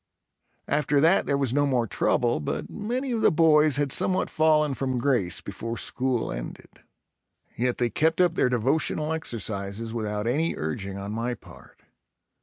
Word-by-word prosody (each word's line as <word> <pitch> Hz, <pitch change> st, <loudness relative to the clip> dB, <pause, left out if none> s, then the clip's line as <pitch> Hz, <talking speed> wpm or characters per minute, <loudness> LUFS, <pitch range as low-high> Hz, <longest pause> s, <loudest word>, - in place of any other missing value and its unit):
After 145 Hz, 0 st, +1 dB
that 165 Hz, +6 st, +4 dB
there 140 Hz, -, +1 dB
was 135 Hz, -3 st, 0 dB
no 145 Hz, +1 st, +2 dB
more 125 Hz, -4 st, +1 dB
trouble 120 Hz, +1 st, +1 dB
but 75 Hz, -, -4 dB
many 245 Hz, +5 st, -3 dB
of 230 Hz, -2 st, -1 dB
the -, -, +5 dB
boys 155 Hz, -2 st, +4 dB
had 140 Hz, -1 st, 0 dB
somewhat 185 Hz, +7 st, +1 dB
fallen 155 Hz, -2 st, +3 dB
from 130 Hz, -1 st, -2 dB
grace 120 Hz, -8 st, +1 dB
before 115 Hz, +4 st, -6 dB
school 130 Hz, -2 st, -1 dB
ended. -, -, -8 dB, 0.7 s
Yet 125 Hz, +1 st, -1 dB
they 120 Hz, -2 st, 0 dB
kept 160 Hz, +2 st, +1 dB
up 175 Hz, -2 st, +4 dB
their 130 Hz, -, +2 dB
devotional 150 Hz, +5 st, 0 dB
exercises 110 Hz, -6 st, -5 dB
without 105 Hz, -2 st, -3 dB
any 150 Hz, +8 st, 0 dB
urging 95 Hz, +6 st, -4 dB
on 100 Hz, +1 st, -5 dB
my 115 Hz, +3 st, -2 dB
part. -, -, -17 dB
130 Hz, 160 wpm, -26 LUFS, 115-155 Hz, 0.7 s, the